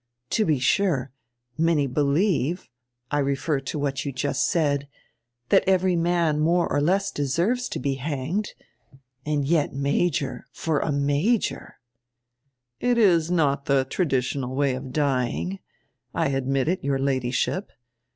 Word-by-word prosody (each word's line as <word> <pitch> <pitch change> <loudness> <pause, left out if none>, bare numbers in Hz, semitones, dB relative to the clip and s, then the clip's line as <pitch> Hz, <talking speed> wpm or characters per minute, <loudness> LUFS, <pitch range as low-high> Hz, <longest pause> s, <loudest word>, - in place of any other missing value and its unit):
To 215 - +2
be 155 -3 +3
sure, 135 -1 +1 0.5
many 160 -3 +3
believe 150 +4 0 0.2
— 120 0 -49
I 145 - +1
refer 140 +1 0
to 135 +3 -5
what 140 -2 -2
you 140 - -3
just 135 +1 0
said 145 -5 +1 0.3
— 120 +1 -52
that - - +5
every 185 -1 +3
man 170 -2 +1
more 170 +3 +2
or 145 - 0
less 195 +6 +1
deserves 175 - 0
to - - -4
be 135 +1 -1
hanged. 155 +8 -2 0.7
And 145 -2 0
yet, 155 -2 +1
Major 140 +1 -1
— - - -58
for 160 -3 +2
a 155 - -1
major 145 +11 0 0.3
— 120 0 -57
" - - -53 0.3
"It 245 -1 +1
is 175 -7 +4
not 145 -5 +1
the 135 -1 +2
traditional 130 -4 -1
way 140 -1 +2
of 130 0 -6
dying. 140 +6 -1 0.6
I - - +1
admit 135 0 0
it, 180 0 0
your 140 0 +1
Ladyship. 135 - -1
145 Hz, 150 wpm, -24 LUFS, 135-170 Hz, 0.7 s, that